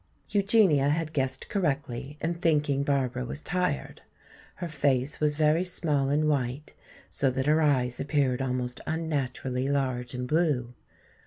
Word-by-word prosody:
Eugenia 195 Hz, -9 st, +4 dB
had 155 Hz, +1 st, -1 dB
guessed 135 Hz, -2 st, -1 dB
correctly 145 Hz, -, -2 dB
in 165 Hz, +2 st, 0 dB
thinking 150 Hz, -5 st, +1 dB
Barbara 130 Hz, -3 st, 0 dB
was 145 Hz, +5 st, -5 dB
tired. 180 Hz, -5 st, -2 dB, 0.5 s
Her 175 Hz, -, -5 dB
face 140 Hz, -3 st, 0 dB
was 150 Hz, -1 st, +2 dB
very 155 Hz, +3 st, +3 dB
small 150 Hz, -6 st, 0 dB
and 150 Hz, +2 st, +2 dB
white, 140 Hz, 0 st, -1 dB, 0.3 s
so 135 Hz, -, 0 dB
that 130 Hz, +1 st, -2 dB
her 155 Hz, +2 st, +3 dB
eyes 130 Hz, -5 st, +1 dB
appeared 140 Hz, -3 st, +1 dB
almost 125 Hz, -1 st, -2 dB
unnaturally 140 Hz, -5 st, -2 dB
large 130 Hz, -3 st, -1 dB
and 125 Hz, 0 st, -3 dB
blue. 145 Hz, -6 st, +1 dB
140 Hz, 140 wpm, -28 LUFS, 130-155 Hz, 0.5 s, Eugenia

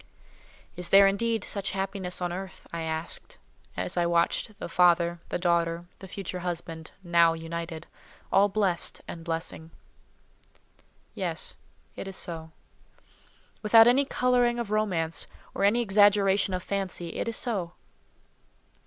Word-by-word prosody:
"Is 180 Hz, 0 st, -3 dB
there, 195 Hz, 0 st, +8 dB
indeed, 220 Hz, +2 st, +1 dB
such 195 Hz, -2 st, -1 dB
happiness 190 Hz, -2 st, -2 dB
on 175 Hz, -1 st, -1 dB
earth?" 190 Hz, +1 st, -7 dB
I 170 Hz, -, -3 dB
asked, 160 Hz, 0 st, -5 dB, 0.4 s
as -, -, -2 dB
I 175 Hz, -1 st, +2 dB
watched 170 Hz, +5 st, +1 dB
the -, -, -5 dB
father, 170 Hz, 0 st, +3 dB
the -, -, -1 dB
daughter, 170 Hz, -1 st, +1 dB
the 190 Hz, -, -10 dB
future 185 Hz, -1 st, -5 dB
husband, 165 Hz, -2 st, -5 dB
now 170 Hz, -2 st, +4 dB
united—all 165 Hz, +4 st, -2 dB
blessed 195 Hz, -4 st, 0 dB
and 165 Hz, -, -7 dB
blessing. 165 Hz, -1 st, -4 dB, 1.4 s
Yes; -, -, -3 dB, 0.4 s
it -, -, -6 dB
is 195 Hz, -, -6 dB
so. 160 Hz, -2 st, -4 dB, 1.1 s
Without 225 Hz, +1 st, +7 dB
any 250 Hz, +4 st, +5 dB
colouring 245 Hz, -2 st, +2 dB
of 235 Hz, -3 st, -4 dB
romance, 180 Hz, -7 st, 0 dB, 0.3 s
or -, -, -2 dB
any 215 Hz, +4 st, +4 dB
exaggeration 200 Hz, -2 st, +4 dB
of 180 Hz, -, -4 dB
fancy, 190 Hz, -3 st, -3 dB
it -, -, -2 dB
is 230 Hz, -, 0 dB
so. 190 Hz, -8 st, -1 dB
180 Hz, 130 wpm, -27 LUFS, 170-205 Hz, 1.4 s, there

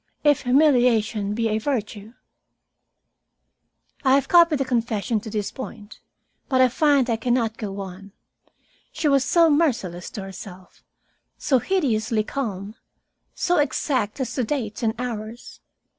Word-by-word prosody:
If 295 Hz, -2 st, +4 dB
humiliation 245 Hz, -7 st, +3 dB
be 230 Hz, 0 st, 0 dB
a 215 Hz, 0 st, 0 dB
virtue 220 Hz, -4 st, -4 dB, 0.9 s
" -, -, -42 dB
I 265 Hz, -1 st, +5 dB
have 275 Hz, -, +1 dB
copied 335 Hz, -3 st, +5 dB
the 270 Hz, -, -1 dB
confession 230 Hz, -3 st, -1 dB
to 220 Hz, -, -9 dB
this 210 Hz, -2 st, -3 dB
point, 225 Hz, -5 st, -9 dB, 0.5 s
but 260 Hz, -2 st, +2 dB
I 255 Hz, -1 st, +6 dB
find 280 Hz, -1 st, +2 dB
I 230 Hz, -2 st, 0 dB
can 240 Hz, +2 st, 0 dB
not 225 Hz, -3 st, -1 dB
go 200 Hz, -2 st, -5 dB
on. 195 Hz, +1 st, -9 dB, 0.8 s
She 310 Hz, -, -2 dB
was 275 Hz, -2 st, +3 dB
so 335 Hz, +4 st, +4 dB
merciless 245 Hz, -, 0 dB
to 200 Hz, -, -4 dB
herself, 190 Hz, -1 st, -11 dB, 0.5 s
so 265 Hz, -3 st, +2 dB
hideously 225 Hz, -, 0 dB
calm, 210 Hz, -5 st, -4 dB, 0.6 s
so 355 Hz, -, +1 dB
exact 270 Hz, -5 st, -1 dB
as 260 Hz, -2 st, -3 dB
to 255 Hz, -, -1 dB
dates 225 Hz, -4 st, -3 dB
and 225 Hz, -1 st, 0 dB
hours. 230 Hz, -1 st, -6 dB
235 Hz, 145 wpm, -23 LUFS, 210-275 Hz, 0.9 s, I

